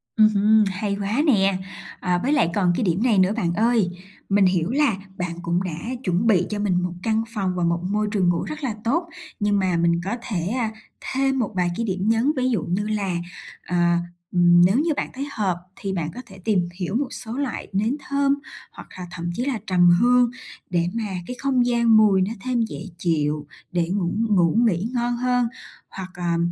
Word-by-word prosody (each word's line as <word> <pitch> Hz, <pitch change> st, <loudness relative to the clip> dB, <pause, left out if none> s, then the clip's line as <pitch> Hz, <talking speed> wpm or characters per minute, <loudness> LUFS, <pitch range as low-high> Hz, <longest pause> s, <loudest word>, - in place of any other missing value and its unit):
Ừm 215 Hz, -1 st, +6 dB
hưm, 215 Hz, +1 st, +4 dB
hay 200 Hz, +2 st, -2 dB
quá 215 Hz, +8 st, 0 dB
nè. 195 Hz, -7 st, +3 dB, 0.4 s
À, 180 Hz, -1 st, +1 dB
với 285 Hz, +4 st, +2 dB
lại 235 Hz, -, +3 dB
còn 180 Hz, -3 st, +2 dB
cái 230 Hz, -, 0 dB
điểm 180 Hz, +3 st, +1 dB
này 230 Hz, -5 st, +3 dB
nữa 185 Hz, +2 st, +4 dB
bạn 175 Hz, -5 st, 0 dB
ơi, 220 Hz, -1 st, +2 dB, 0.4 s
mình 195 Hz, -1 st, +4 dB
hiểu 180 Hz, 0 st, +1 dB
là 280 Hz, -6 st, +2 dB, 0.2 s
bạn 180 Hz, -1 st, -3 dB
cũng 175 Hz, +2 st, 0 dB
đã 180 Hz, -, -3 dB, 0.3 s
chuẩn 185 Hz, +2 st, +1 dB
bị 185 Hz, -5 st, +4 dB
cho 210 Hz, -1 st, -3 dB
mình 185 Hz, -3 st, +1 dB
1 180 Hz, -1 st, -2 dB
căn 225 Hz, 0 st, +1 dB
phòng 190 Hz, -4 st, -1 dB
và 180 Hz, -, -1 dB
một 170 Hz, 0 st, +1 dB
môi 210 Hz, +3 st, 0 dB
trường 190 Hz, -5 st, +2 dB
ngủ 175 Hz, -, 0 dB
rất 305 Hz, -1 st, -6 dB
là 240 Hz, -6 st, -1 dB
tốt, 335 Hz, +9 st, 0 dB, 0.3 s
nhưng 205 Hz, -1 st, +2 dB
mà 185 Hz, -2 st, +1 dB
mình 170 Hz, 0 st, +2 dB
có 200 Hz, +5 st, -2 dB
thể, 180 Hz, -8 st, -3 dB
a, 230 Hz, -1 st, -1 dB, 0.4 s
thêm 270 Hz, 0 st, +1 dB
một 225 Hz, -4 st, -1 dB
vài 180 Hz, -1 st, +1 dB
cái 230 Hz, -, -1 dB
điểm 190 Hz, +1 st, -1 dB
nhấn, 230 Hz, +6 st, +3 dB
ví 255 Hz, 0 st, +1 dB
dụ 230 Hz, -, 0 dB
như 190 Hz, +4 st, -1 dB
là, 200 Hz, -4 st, -1 dB, 0.5 s
à, 175 Hz, -1 st, +1 dB, 0.3 s
ừm, 175 Hz, -1 st, +5 dB
nếu 190 Hz, +4 st, +3 dB
như 310 Hz, +2 st, +2 dB
bạn -, -, -2 dB
thấy 275 Hz, +2 st, -4 dB
hợp 190 Hz, -7 st, -1 dB, 0.2 s
thì 200 Hz, -5 st, -4 dB
bạn 165 Hz, -3 st, -2 dB
có 250 Hz, -, -6 dB
thể 190 Hz, -, -14 dB
tìm 185 Hz, -5 st, +1 dB
hiểu 190 Hz, +3 st, -2 dB
một 275 Hz, +1 st, 0 dB
số 225 Hz, -, -8 dB
loại 280 Hz, -3 st, -3 dB
nến 220 Hz, +8 st, 0 dB
thơm, 280 Hz, 0 st, +2 dB, 0.4 s
hoặc -, -, -12 dB
là 180 Hz, -, -6 dB
thậm 170 Hz, 0 st, -4 dB
chí 245 Hz, +6 st, -2 dB
là 255 Hz, -6 st, -1 dB
trầm 175 Hz, -2 st, +5 dB
hương 245 Hz, 0 st, +4 dB, 0.4 s
để 170 Hz, -1 st, +1 dB
mà 230 Hz, -, -2 dB, 0.2 s
cái 250 Hz, -, -5 dB
không 260 Hz, -3 st, +2 dB
gian 235 Hz, -2 st, +4 dB
mùi 200 Hz, -3 st, +5 dB
nó 195 Hz, +4 st, 0 dB
thêm 250 Hz, 0 st, 0 dB
dễ 225 Hz, -, -3 dB, 0.2 s
chịu, 150 Hz, -3 st, -1 dB, 0.2 s
để 175 Hz, -1 st, 0 dB
ngủ 180 Hz, -2 st, 0 dB, 0.2 s
ngủ 180 Hz, -3 st, +3 dB
nghỉ 195 Hz, +3 st, 0 dB
ngon 240 Hz, 0 st, 0 dB
hơn, 245 Hz, -1 st, +1 dB, 0.4 s
hoặc, 190 Hz, -1 st, -7 dB
à, 175 Hz, -1 st, -1 dB
200 Hz, 215 wpm, -23 LUFS, 180-235 Hz, 0.5 s, Ừm